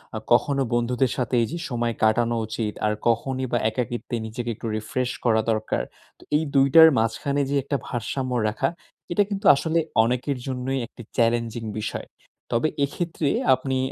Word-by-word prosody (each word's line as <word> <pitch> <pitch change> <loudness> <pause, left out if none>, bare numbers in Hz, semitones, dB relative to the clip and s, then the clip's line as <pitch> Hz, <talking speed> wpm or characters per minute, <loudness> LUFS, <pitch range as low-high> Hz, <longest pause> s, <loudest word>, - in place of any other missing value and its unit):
আ - - -1
কখনো 140 +3 +3
বন্ধুদের 120 +1 +1
সাথে 125 -1 -1
এই 115 - +1
যে 170 - -3
সময় 120 -2 -1
কাটানো 115 +2 +3
উচিত। 110 -1 -3
আর 105 - +2
কখনই 130 +3 0
বা, 120 - +2
একাকিত্বে 120 +2 -3
নিজেকে 120 +2 -5
একটু 115 - -6
রিফ্রেশ 125 +3 -2 0.2
করা 110 -2 +4
দরকার। 110 - -1 0.4
তো - - -16
এই 155 - +3
দুইটার 140 +4 +8
মাঝখানে 125 +6 0
যে 140 - 0
একটা 140 +1 -1
ভারসাম্য 130 +2 -3 0.2
রাখা 105 - 0 0.4
এটা 205 +4 +3
কিন্তু 200 0 -4
আসলে 160 +4 0 0.2
অনেকের 125 +3 -1
জন্যই 130 +1 -2
একটি - - -13 0.2
চ্যালেঞ্জিং 115 0 +1 0.2
বিষয়। 105 - -4 0.4
তবে 120 +6 +2 0.2
এক্ষেত্রে 165 +1 -3 0.3
আপনি 130 0 -2
125 Hz, 160 wpm, -24 LUFS, 115-135 Hz, 0.4 s, দুইটার